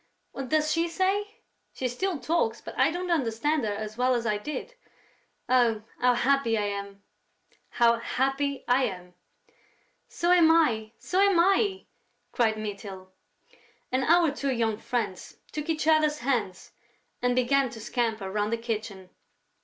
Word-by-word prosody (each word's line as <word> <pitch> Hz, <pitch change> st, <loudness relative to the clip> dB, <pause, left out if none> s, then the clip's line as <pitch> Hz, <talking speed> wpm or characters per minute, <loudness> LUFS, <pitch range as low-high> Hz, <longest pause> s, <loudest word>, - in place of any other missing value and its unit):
What 270 Hz, -2 st, -6 dB
does 310 Hz, 0 st, +2 dB
she 335 Hz, +1 st, +1 dB
say?... 405 Hz, +5 st, -1 dB, 0.3 s
She 260 Hz, -, -1 dB
still 345 Hz, +8 st, -2 dB
talks, 320 Hz, +7 st, 0 dB
but -, -, -9 dB
I -, -, +3 dB
don't 355 Hz, +1 st, -3 dB
understand 290 Hz, 0 st, 0 dB
her 210 Hz, -, -1 dB
as 215 Hz, +2 st, -6 dB
well 255 Hz, 0 st, +3 dB
as 235 Hz, -1 st, -2 dB
I 210 Hz, -2 st, 0 dB
did.... 300 Hz, -, -6 dB, 0.7 s
Oh, 235 Hz, -4 st, +2 dB, 0.2 s
how 250 Hz, 0 st, +3 dB
happy 260 Hz, -3 st, +2 dB
I 210 Hz, -, 0 dB
am, 200 Hz, 0 st, -5 dB, 0.7 s
how 235 Hz, -1 st, +3 dB
happy 270 Hz, +3 st, -1 dB
I 255 Hz, +2 st, +3 dB
am!..." 180 Hz, -5 st, -7 dB, 0.9 s
"So 345 Hz, +1 st, 0 dB
am 345 Hz, -3 st, +6 dB
I, 235 Hz, -10 st, +2 dB
so 370 Hz, -, -2 dB
am 395 Hz, -3 st, +4 dB
I!" 385 Hz, +2 st, +2 dB, 0.5 s
cried 220 Hz, -2 st, +1 dB
Mytyl. 200 Hz, -3 st, -7 dB, 0.8 s
And 260 Hz, +1 st, +1 dB
our 335 Hz, -1 st, +4 dB
two 280 Hz, -1 st, -2 dB
young 225 Hz, -3 st, 0 dB
friends 215 Hz, -8 st, -4 dB
took 305 Hz, +1 st, -5 dB
each 310 Hz, -1 st, -1 dB
other's 310 Hz, -1 st, +3 dB
hands 235 Hz, -8 st, -2 dB, 0.5 s
and 245 Hz, 0 st, +1 dB
began 260 Hz, +1 st, +2 dB
to 225 Hz, -, -10 dB
scamper 220 Hz, -4 st, -2 dB
round 210 Hz, +1 st, -1 dB
the 230 Hz, -, 0 dB
kitchen. 215 Hz, -5 st, -5 dB
250 Hz, 155 wpm, -27 LUFS, 220-310 Hz, 0.9 s, am